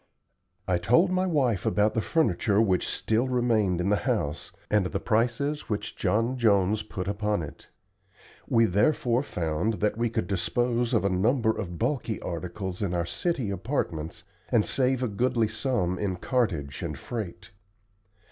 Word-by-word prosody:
I 90 -1 +2
told 125 - +4
my 185 0 +1
wife 130 - +1
about 105 +1 +2
the 110 - +1
furniture 105 - +1
which 95 -5 +2
still 115 +4 0
remained 115 -8 +1
in 90 +2 0
the 105 - +4
house, 85 -10 -1 0.2
and 105 -3 +2
the - - -3
prices 125 +6 0
which 105 +1 -3
John 115 +4 0
Jones 105 -2 +3
put 95 -3 -6
upon 105 -2 -1
it. 75 - -10 0.8
We 115 -4 +4
therefore 120 - +2
found 85 - -1
that 105 +2 -1
we 120 0 +1
could 110 -4 -1
dispose 120 +6 0
of 105 - +2
a - - +3
number 110 +5 +2
of 90 -6 -5
bulky 120 - -1
articles 90 +2 -5
in 90 -3 -1
our 85 -1 0
city 135 - -1
apartments, 95 - -3 0.3
and 115 -4 +3
save 130 -1 +1
a - - +1
goodly 115 +1 +1
sum 110 -5 -1
in 95 -3 -1
cartage 90 - -1
and - - -4
freight. 95 -6 -6
110 Hz, 155 wpm, -27 LUFS, 95-120 Hz, 0.8 s, told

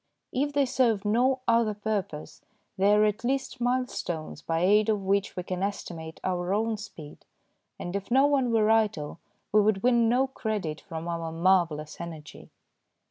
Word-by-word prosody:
If 285 +3 0
they 285 -1 +3
serve 235 -6 +1
no 255 +5 +2
other 230 -2 +3
purpose, 200 -7 -4 0.3
they 200 +1 +3
are 210 0 +5
at 210 +2 -1
least 265 0 -2
mile 250 +1 +1
stones 160 - -5
by 165 +1 -1
aid 210 +4 +4
of 215 -2 +2
which 200 +1 0
we 180 - -3
can 185 0 -4
estimate 170 -5 -5
our 180 +1 -1
own 220 +1 0
speed, 165 -8 -11 0.5
and 175 +2 -5
if 200 -1 -4
no 265 +3 +5
one 275 -4 +2
were 220 -1 +3
idle 210 -9 +1 0.3
we 210 - +5
would 205 -2 +1
win 240 -2 +4
no 250 +3 +3
credit 215 -11 -4
from 165 -2 -7
our 165 -1 -3
marvellous 165 -3 +1
energy. 160 -3 -9
205 Hz, 170 wpm, -27 LUFS, 175-235 Hz, 0.5 s, are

